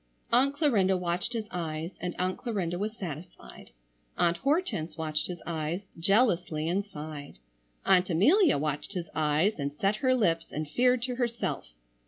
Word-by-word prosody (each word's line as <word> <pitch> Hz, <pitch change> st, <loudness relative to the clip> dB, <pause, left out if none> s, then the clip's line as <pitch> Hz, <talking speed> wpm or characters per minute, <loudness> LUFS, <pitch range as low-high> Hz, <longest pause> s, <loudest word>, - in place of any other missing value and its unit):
Aunt 270 Hz, +4 st, +4 dB
Clarinda 210 Hz, -, +3 dB
watched 180 Hz, +5 st, -1 dB
his 225 Hz, -2 st, -3 dB
eyes, 165 Hz, -1 st, -3 dB
and 180 Hz, -1 st, -3 dB
Aunt 185 Hz, +1 st, -1 dB
Clarinda 185 Hz, -8 st, -2 dB
was 215 Hz, +3 st, -3 dB
satisfied. 170 Hz, -1 st, -8 dB, 0.5 s
Aunt 170 Hz, -1 st, +2 dB
Hortense 275 Hz, -, 0 dB
watched 155 Hz, -1 st, -1 dB
his 175 Hz, -2 st, -7 dB
eyes, 165 Hz, +2 st, -2 dB, 0.2 s
jealously 175 Hz, -5 st, +2 dB
and 190 Hz, +4 st, +1 dB
sighed. 150 Hz, -, -8 dB, 0.5 s
Aunt 185 Hz, -1 st, +4 dB
Amelia 295 Hz, -, +5 dB
watched 150 Hz, +6 st, -2 dB
his 175 Hz, -3 st, -5 dB
eyes 155 Hz, +6 st, +2 dB
and 140 Hz, 0 st, -1 dB
set 195 Hz, +8 st, 0 dB
her 255 Hz, +2 st, +3 dB
lips 165 Hz, -9 st, +1 dB
and 155 Hz, +1 st, -3 dB
feared 250 Hz, +7 st, +2 dB
to 250 Hz, -1 st, -2 dB
herself. 235 Hz, -, -2 dB
180 Hz, 155 wpm, -29 LUFS, 160-225 Hz, 0.5 s, Amelia